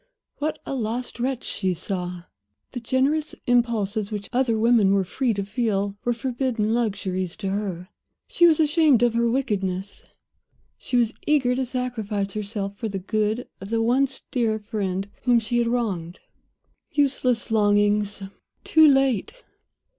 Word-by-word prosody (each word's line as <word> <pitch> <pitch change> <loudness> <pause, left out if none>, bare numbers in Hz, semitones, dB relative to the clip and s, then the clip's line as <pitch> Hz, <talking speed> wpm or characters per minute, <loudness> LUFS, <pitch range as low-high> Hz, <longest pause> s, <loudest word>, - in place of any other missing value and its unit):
What 310 +1 -1
a - - -4
lost 245 0 -3
wretch 255 0 -1
she 190 -3 -1
saw! 180 -1 -4 0.5
The 250 - -5
generous 270 +6 0
impulses 225 -4 +1
which 205 -2 -5
other 245 -3 +2
women 220 -3 +4
were 195 -1 +3
free 250 +7 -1
to 200 - -2
feel 205 -2 -1
were 240 - +1
forbidden 235 -2 -1
luxuries 190 -6 -2
to 200 -3 -3
her. 190 -3 -3 0.4
She 345 - +5
was 320 -2 +4
ashamed 300 -5 +4
of 240 -1 +3
her 235 0 +2
wickedness; 200 -7 -2 0.7
she 250 - -2
was 235 -1 +2
eager 275 -5 +3
to 260 0 -1
sacrifice 220 -6 -3
herself, 200 -1 -4
for 225 - -3
the 195 - -3
good 215 +4 -1
of 195 - -7
the 225 0 +1
once 265 +3 +1
dear 230 -4 +1
friend 200 -3 -3 0.2
whom 245 -2 +5
she 235 +1 0
had 235 - +1
wronged. 195 -8 -2 0.7
Useless 265 -6 +1
longings! 205 -1 +2 0.4
Too 315 -1 +6
late! 270 - +2
225 Hz, 145 wpm, -24 LUFS, 200-250 Hz, 0.7 s, Too